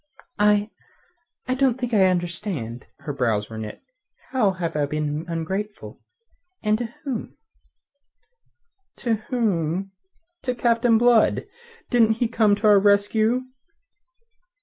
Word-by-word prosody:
"I... 210 +1 +3 0.8
I 255 - +1
don't 260 -1 +1
think 245 -2 -3
I 195 -3 +5
understand." 170 - -3
Her 145 - -4
brows 115 -5 -1
were 110 - -6
knit. 110 -1 -7 0.5
"How 250 -6 +3
have 175 -4 -4
I 145 -1 +1
been 150 +1 -2
ungrateful 190 +6 -5 0.6
and 215 0 +2
to 240 - -2 0.2
whom?" 260 -7 -5 1.6
"To 235 -3 -1 0.2
whom? 195 -6 0 0.5
To 250 -1 -2
Captain 235 -1 +3
Blood. 235 -1 +4 0.5
Didn't 225 -2 +4
he 235 +2 0
come 220 -3 +3
to 215 - -4
our 205 -1 +7
rescue?" 215 +4 +2
210 Hz, 120 wpm, -23 LUFS, 165-230 Hz, 1.6 s, our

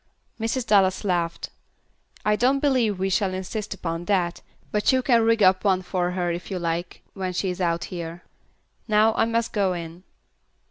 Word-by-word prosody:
Mrs. 230 +2 -1
Dallas 195 -3 +3
laughed. 175 -4 -1 0.7
"I 210 0 +3
don't 255 +5 +3
believe 255 -8 +2
we 190 +1 -1
will 190 -2 0
insist 200 +3 -4
upon 170 -2 -4
that, 175 -3 0 0.3
but 210 0 +2
you 260 -1 +2
can 235 -3 +4
rig 225 -1 +3
up 185 0 +4
one 190 -2 +2
for 180 -1 -1
her 180 -1 -1
if 170 +1 -5
you 190 - -3
like, 170 0 -3
when 185 -2 -3
she 185 +1 -1
is 180 - -6
out 170 -1 0
here. 170 0 -6 0.6
Now 215 0 +4
I 225 - +2
must 230 0 -1
go 195 -3 +1
in." 170 0 -7
190 Hz, 180 wpm, -24 LUFS, 175-220 Hz, 0.7 s, can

